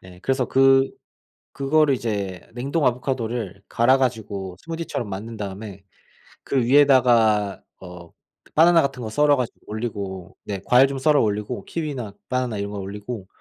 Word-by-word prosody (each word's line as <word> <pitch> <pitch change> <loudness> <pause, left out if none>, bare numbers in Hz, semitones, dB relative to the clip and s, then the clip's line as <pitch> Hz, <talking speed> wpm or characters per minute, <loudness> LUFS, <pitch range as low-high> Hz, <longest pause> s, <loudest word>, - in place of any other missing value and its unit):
네. 90 -1 -14
그래서 135 -1 0
그 135 0 +4 0.6
그거를 140 +1 +2
이제 100 -6 -4
냉동 140 +5 -1
아보카도를 120 -5 -2
갈아 130 +3 +4
가지고 105 -7 -3
스무디처럼 165 -9 -5
만든 110 +4 -6
다음에 100 -1 -7 0.6
그 130 -3 0
위에다가 120 -7 +4 0.2
어 90 -2 -11 0.4
바나나 165 +1 +6
같은 135 -2 -3
거 110 - -4
썰어 145 +5 +3
가지고 125 -2 -3
올리고 100 -4 -6
네 100 -2 -5
과일 125 +2 +6
좀 135 -1 -4
썰어 150 0 +4
올리고 105 +2 -2
키위나 135 -11 -4 0.2
바나나 125 -4 -1
이런 100 0 -4
거 105 - -6
올리고 100 +1 -6
120 Hz, 325 characters per minute, -23 LUFS, 100-135 Hz, 0.6 s, 바나나